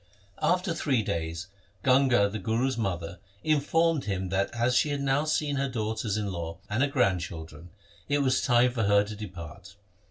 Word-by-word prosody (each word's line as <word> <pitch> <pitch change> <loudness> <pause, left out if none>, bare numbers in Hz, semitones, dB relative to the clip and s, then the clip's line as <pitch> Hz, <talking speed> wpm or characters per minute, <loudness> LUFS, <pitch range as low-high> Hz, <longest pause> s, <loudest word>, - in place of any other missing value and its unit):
After 180 0 +1
three 135 -8 0
days 85 -1 -3 0.4
Ganga 130 -5 +4
the 105 +1 -5
Guru's 115 +6 0
mother 90 -6 -3 0.2
in 155 -1 +3
formed 165 +1 +1
him 95 -2 -2
that 95 +1 0
as 120 +1 +1
she 150 - +3
had 145 -1 -2
now 140 +2 +1
seen 150 -2 0
her 135 0 0
daughters 110 -2 -2
in 105 -2 -2
law, 85 -1 -5
and 110 +5 +1
her 145 - +3
grandchildren, 85 - -2 0.4
it 145 0 +2
was 130 -1 +2
time 125 -1 +4
for 115 -3 -1
her 100 0 +4
to 105 +1 -7
depart. 95 -1 -9
110 Hz, 180 wpm, -28 LUFS, 95-135 Hz, 0.4 s, Ganga